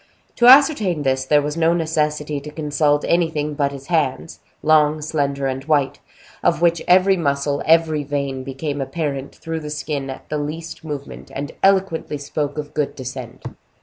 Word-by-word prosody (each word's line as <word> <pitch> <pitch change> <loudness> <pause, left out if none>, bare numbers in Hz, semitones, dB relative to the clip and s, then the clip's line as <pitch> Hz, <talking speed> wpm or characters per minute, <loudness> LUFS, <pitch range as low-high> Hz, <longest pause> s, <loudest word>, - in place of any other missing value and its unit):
To 240 - +5
ascertain 250 - +6
this, 130 -1 0
there 145 +1 +3
was 150 +1 -3
no 165 0 +3
necessity 150 -2 -1
to 150 - -9
consult 150 -1 0
anything 160 -3 +1
but 140 -1 0
his 135 -1 -9
hands, 155 -1 -1 0.2
long, 155 0 +4
slender, 140 -2 -1
and 135 0 -2
white, 145 -3 +1 0.4
of - - +2
which 170 -1 +2
every 190 +2 +5
muscle, 140 -2 0
every 160 -2 +3
vein, 140 -2 -3
became 140 +2 -4
apparent 140 -1 -4
through 165 -1 -5
the 150 -1 -7
skin 145 -2 -4
at 135 - -8
the 150 - -2
least 160 +3 -6
movement, 145 -3 -7
and 140 +1 -4
eloquently 190 -6 +2
spoke 145 +1 -3
of 150 -1 -5
good 150 -2 -1
descent. 130 -2 -8
150 Hz, 165 wpm, -20 LUFS, 140-160 Hz, 0.4 s, ascertain